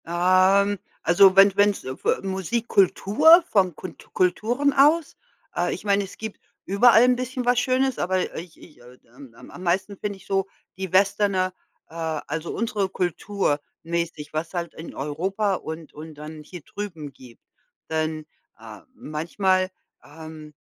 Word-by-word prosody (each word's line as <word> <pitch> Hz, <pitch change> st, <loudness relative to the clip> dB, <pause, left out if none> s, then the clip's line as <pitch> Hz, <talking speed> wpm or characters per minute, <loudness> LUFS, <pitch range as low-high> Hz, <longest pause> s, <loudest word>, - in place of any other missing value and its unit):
Ähm, 185 Hz, +3 st, +3 dB, 0.2 s
also 185 Hz, +3 st, +6 dB
wenn 195 Hz, 0 st, +6 dB
wenn's 205 Hz, 0 st, +2 dB
f 130 Hz, 0 st, -8 dB
äh, -, -, +1 dB
Musikkultur, 215 Hz, -, +3 dB
von 185 Hz, -5 st, +2 dB
Kunt 185 Hz, -, -10 dB
Kulturen 235 Hz, +10 st, +1 dB
aus. 300 Hz, +4 st, +3 dB, 0.4 s
Äh, -, -, 0 dB
ich -, -, -7 dB
meine, 200 Hz, -1 st, +2 dB
es 195 Hz, -, -11 dB
gibt 220 Hz, -1 st, -7 dB, 0.3 s
überall 225 Hz, +4 st, +5 dB
'n 250 Hz, 0 st, +4 dB
bisschen 255 Hz, 0 st, -4 dB
was 245 Hz, 0 st, +3 dB
Schönes, 260 Hz, 0 st, 0 dB
aber 185 Hz, +1 st, -1 dB
ich 170 Hz, 0 st, -9 dB
ich, 155 Hz, -, -17 dB
äh, 125 Hz, +1 st, -16 dB, 0.2 s
ähm, 135 Hz, -3 st, -14 dB, 0.2 s
am 180 Hz, -, -10 dB
meisten 190 Hz, +3 st, -1 dB
finde 205 Hz, 0 st, -4 dB
ich -, -, -19 dB
so 195 Hz, -1 st, 0 dB, 0.3 s
die 190 Hz, -2 st, -5 dB
Westerne, 195 Hz, -1 st, +2 dB, 0.4 s
äh, -, -, -18 dB
also 160 Hz, 0 st, -4 dB
unsere 215 Hz, -4 st, -1 dB
Kultur 185 Hz, -3 st, -1 dB, 0.2 s
mäßig, 165 Hz, -3 st, -4 dB
was 160 Hz, +3 st, -4 dB
halt 170 Hz, -2 st, -4 dB
in 165 Hz, -, -10 dB
Europa 190 Hz, +8 st, -1 dB
und 160 Hz, -2 st, -8 dB
und 155 Hz, +1 st, -10 dB
dann 150 Hz, +1 st, -9 dB
hier 175 Hz, +3 st, -10 dB
drüben 165 Hz, -5 st, -7 dB
gibt. 125 Hz, -2 st, -16 dB, 0.5 s
Denn, 155 Hz, -1 st, -2 dB, 0.3 s
äh, -, -, -11 dB
manchmal, 185 Hz, -, -1 dB, 0.3 s
ähm, 155 Hz, 0 st, -11 dB
185 Hz, 150 wpm, -24 LUFS, 160-205 Hz, 0.5 s, also